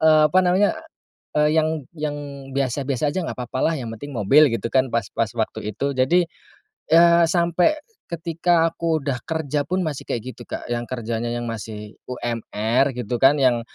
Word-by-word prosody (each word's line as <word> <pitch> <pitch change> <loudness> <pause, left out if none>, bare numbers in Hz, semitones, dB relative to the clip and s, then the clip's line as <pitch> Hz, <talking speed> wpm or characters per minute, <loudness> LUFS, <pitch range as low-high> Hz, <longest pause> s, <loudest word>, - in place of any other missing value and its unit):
eee, 155 -1 +6
apa 185 - +5
namanya, 185 +3 +3 0.7
eee, 150 +1 +3
yang 155 -3 0
yang 150 -2 -3 0.3
biasa-biasa 135 +1 -1
aja, 185 - 0
nggak - - -5
apa-apa 130 +5 -1
lah, - - -1
yang 120 - -5
penting 145 +6 -9
mobil 135 +6 +4
gitu 115 -1 -2
kan, 130 -1 +2
pas 115 -4 0
pas 115 -1 0
waktu 105 -1 -2
itu. 140 +6 -2
Jadi, 165 +7 +3 0.6
ya 170 0 +6
sampai 175 - +2 0.3
ketika 170 0 +1
aku 165 -2 -1
udah 130 -3 -2
kerja 150 -3 -2
pun 180 +3 -1
masih 145 -3 -3
kayak 125 +2 -4
gitu - - -15
Kak, - - -6
yang 120 0 -1
kerjanya 120 -1 -3
yang 120 0 -3
masih 105 -2 -6 0.2
UMR 120 +1 0
gitu 120 0 -2
kan, 135 +2 +6
yang 125 -4 +3
140 Hz, 175 wpm, -22 LUFS, 120-160 Hz, 0.7 s, eee